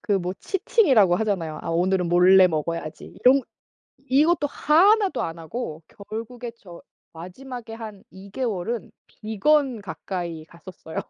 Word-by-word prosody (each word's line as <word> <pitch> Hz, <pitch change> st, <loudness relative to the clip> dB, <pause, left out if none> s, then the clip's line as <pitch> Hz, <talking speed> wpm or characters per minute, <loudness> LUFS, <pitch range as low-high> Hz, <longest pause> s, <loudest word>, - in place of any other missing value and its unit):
그 205 Hz, -2 st, 0 dB
뭐 180 Hz, 0 st, -3 dB
치팅이라고 280 Hz, -, +3 dB
하잖아요. 185 Hz, -8 st, -2 dB
아 -, -, -6 dB
오늘은 180 Hz, +1 st, +1 dB
몰래 185 Hz, +2 st, +6 dB
먹어야지. 160 Hz, 0 st, -4 dB, 0.2 s
이런 265 Hz, +2 st, +6 dB, 0.6 s
이것도 290 Hz, +4 st, +2 dB
하나도 385 Hz, +8 st, +3 dB
안 165 Hz, 0 st, -4 dB
하고 160 Hz, -2 st, -6 dB, 0.3 s
결국에 230 Hz, +2 st, -6 dB
저 175 Hz, -6 st, -13 dB, 0.3 s
마지막에 225 Hz, +7 st, -9 dB
한 215 Hz, -3 st, -9 dB
2 190 Hz, +1 st, -13 dB
개월은 230 Hz, -2 st, -3 dB, 0.2 s
비건 240 Hz, +3 st, 0 dB
가까이 175 Hz, -4 st, -6 dB
갔었어요. 170 Hz, -1 st, -12 dB
205 Hz, 285 characters per minute, -24 LUFS, 175-255 Hz, 0.6 s, 몰래